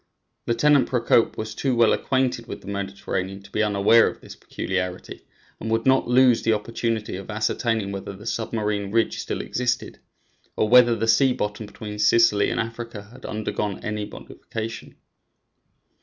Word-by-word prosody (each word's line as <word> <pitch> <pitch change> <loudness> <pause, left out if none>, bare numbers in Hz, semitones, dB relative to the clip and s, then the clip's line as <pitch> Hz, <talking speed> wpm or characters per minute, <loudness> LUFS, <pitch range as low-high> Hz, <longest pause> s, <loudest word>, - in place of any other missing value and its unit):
Lieutenant 140 +4 +3
Procope 120 -2 +2
was 110 0 -4
too 130 +2 -1
well 115 -1 +4
acquainted 130 -3 0
with - - -7
the - - -15
Mediterranean 95 -1 -4
to 100 - -16
be 110 - 0
unaware 105 +2 +4
of - - -5
this - - -12
peculiarity, 90 -1 -5 0.3
and 110 - -5
would 115 0 0
not 130 0 +3
lose 125 -1 +5
the 115 - +2
opportunity 110 -1 -2
of 95 - -9
ascertaining 110 -1 -1
whether 100 0 -5
the 100 +3 -12
submarine 105 -3 -2
ridge 115 +1 +1
still - - -3
existed, 125 0 -2 0.6
or 110 - +1
whether 120 0 +6
the 115 0 -2
sea 130 +3 +4
bottom 105 -1 -4
between 105 0 -8
Sicily 105 0 +4
and - - -2
Africa 115 -2 -5
had 130 +1 -10
undergone 105 -2 -3
any 105 -1 -3
modification. 115 +2 -8
110 Hz, 155 wpm, -24 LUFS, 105-115 Hz, 0.6 s, whether